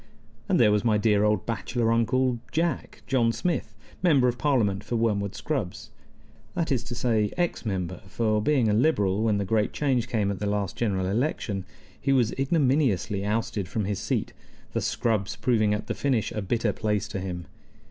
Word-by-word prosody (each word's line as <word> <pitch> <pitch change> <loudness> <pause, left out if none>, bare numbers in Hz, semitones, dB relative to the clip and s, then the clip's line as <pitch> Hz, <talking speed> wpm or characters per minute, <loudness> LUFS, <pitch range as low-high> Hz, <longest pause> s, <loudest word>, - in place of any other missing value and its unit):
And - - +3
there 105 - +6
was 105 +1 +2
my 110 -3 +3
dear 105 -1 +3
old 105 -2 +2
bachelor 115 0 -1
Uncle 120 +2 +2
Jack 165 -2 -2
John 120 -4 +2
Smith, 130 - -2 0.3
Member 145 -8 +4
of 120 0 -1
Parliament 110 -10 +1
for 120 - -3
Wormwood 105 -3 0
Scrubbs. 135 - -4 0.6
That 170 -3 -1
is 125 -3 +1
to 120 0 -5
say, 115 -3 +1
ex 175 -9 -1
Member; 90 -3 -3
for, 110 +2 0
being 130 -1 +2
a 105 - +2
Liberal 105 -6 +2
when 110 -2 +2
the 100 - -1
great 105 +1 +1
change 130 -5 +1
came 105 -5 0
at 95 - -5
the 105 - -1
last 100 -2 -1
general 95 -5 0
election, 100 -2 -1 0.4
he 135 - +1
was 125 -5 +3
ignominiously 135 - +1
ousted 105 -2 -1
from 105 +3 -2
his 100 -1 -2
seat, - - -2 0.4
the - - 0
Scrubbs 105 -3 0
proving 110 -1 +2
at 105 0 -1
the - - -2
finish 130 -6 0
a 105 - -3
bitter 110 +2 0
place 105 -2 -1
to 95 - -4
him. 90 -2 -5
110 Hz, 185 wpm, -26 LUFS, 100-125 Hz, 0.6 s, there